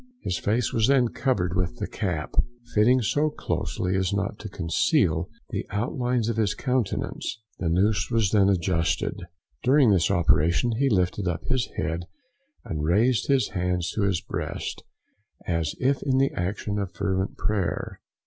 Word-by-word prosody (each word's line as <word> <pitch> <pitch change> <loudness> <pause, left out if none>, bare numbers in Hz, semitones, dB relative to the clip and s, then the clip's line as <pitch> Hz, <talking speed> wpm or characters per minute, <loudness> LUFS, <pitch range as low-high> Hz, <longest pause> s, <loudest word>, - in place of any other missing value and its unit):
His 90 - -1
face 110 +2 0
was 110 -1 +3
then 130 -3 +4
covered 95 -11 0
with 90 -2 -1
the - - -2
cap, 85 -6 -3 0.4
fitting 120 +4 +4
so 145 +9 +2
closely 95 -9 -2
as 95 -2 +1
not 100 +1 -2
to 105 - -7
conceal 85 -4 +1 0.2
the - - -2
outlines 120 +2 -1
of 115 -1 -1
his 110 -3 +1
countenance, 125 -3 -2 0.2
the 85 - 0
noose 95 +1 +2
was 115 -5 +2
then 100 -2 +4
adjusted. 85 -3 0 0.4
During 130 -3 +5
this 90 -4 +3
operation 85 +6 +3
he 140 0 +3
lifted 90 -2 +1
up 85 -2 -2
his 125 -2 -1
head 85 +2 -2 0.6
and 75 -2 -3
raised 105 +7 +2
his 135 -5 +2
hands 90 -3 -1
to 110 - -2
his 100 -4 +1
breast, - - -4 0.6
as 85 -3 -1
if 135 +2 +1
in 130 -1 +1
the 135 +1 +3
action 100 +3 -2
of 100 -2 -4
fervent 95 -1 -1
prayer. 100 -7 -2
100 Hz, 160 wpm, -26 LUFS, 90-120 Hz, 0.6 s, During